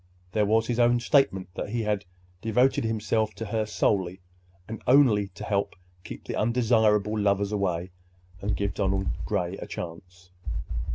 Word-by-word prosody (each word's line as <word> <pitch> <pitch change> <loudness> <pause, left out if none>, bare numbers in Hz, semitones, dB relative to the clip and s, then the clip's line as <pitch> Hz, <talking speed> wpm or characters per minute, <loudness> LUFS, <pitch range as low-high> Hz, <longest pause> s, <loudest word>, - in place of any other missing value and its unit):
There 105 0 +1
was 110 +2 +3
his 120 +1 -1
own 120 0 +4
statement 120 -8 +2
that 95 - -4
he 115 +1 -1
had 105 -2 -1 0.4
devoted 120 +3 +2
himself 110 0 0
to 115 - -5
her 110 0 -1
solely 95 -4 0 0.5
and 110 0 -7
only 125 -7 +5
to - - -8
help 100 -1 -1 0.3
keep - - -9
the - - -4
undesirable 110 -2 +2
lovers 100 0 +1
away 90 -3 -1 0.5
and 105 +1 -1
give 100 -2 -1
Donald 95 -1 0 0.2
Gray 90 +2 -1
a - - -7
chance. 90 +1 -8
105 Hz, 155 wpm, -27 LUFS, 95-115 Hz, 0.5 s, only